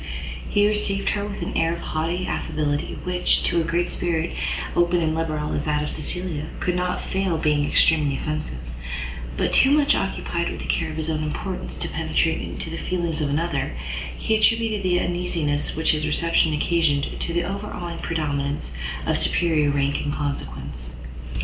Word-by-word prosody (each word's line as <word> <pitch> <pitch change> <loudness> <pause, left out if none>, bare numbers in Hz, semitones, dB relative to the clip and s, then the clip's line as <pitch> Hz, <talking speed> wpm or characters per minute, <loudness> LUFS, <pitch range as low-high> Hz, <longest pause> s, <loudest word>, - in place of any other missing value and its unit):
He 205 -1 +4
received 205 -2 +1
her 205 - 0
with 205 - -4
an - - -4
air 165 0 +2
of 170 - -5
haughty 170 +4 -1
affability 150 -4 -1
which, 180 0 +2
to 170 - +3
a 170 +2 +1
spirit 170 -1 0 0.4
open 175 0 +4
and 160 -2 +1
liberal 155 -2 -1
as 145 - -1
that 150 -1 +1
of 150 - -2
Cecilia, 175 -4 -3
could 180 - 0
not 180 0 -1
fail 190 -3 0
being 150 -2 +2
extremely 150 -3 +4
offensive; 155 - -3 0.8
but - - +1
too 265 - +7
much 290 0 +5
occupied - - -1
with - - -5
the - - -5
care - - 0
of - - -6
his 160 -1 -2
own 155 -1 0
importance 180 +5 -4
to - - -2
penetrate 160 0 +1
into 165 - -5
the 165 - -4
feelings 170 -3 -1
of 145 - +1
another, 145 - -1 0.4
he 220 - +1
attributed 220 -1 +3
the 180 -2 +2
uneasiness 170 -5 -1
which 160 +1 +3
his 155 0 0
reception 165 +1 +3
occasioned 150 -2 +1
to - - -2
the 175 +1 +1
overawing 180 -3 -4
predominance 145 - -2 0.3
of - - +2
superior 160 -4 +3
rank 140 0 +1
and 145 - -1
consequence. 65 - -4
160 Hz, 170 wpm, -24 LUFS, 150-180 Hz, 0.8 s, too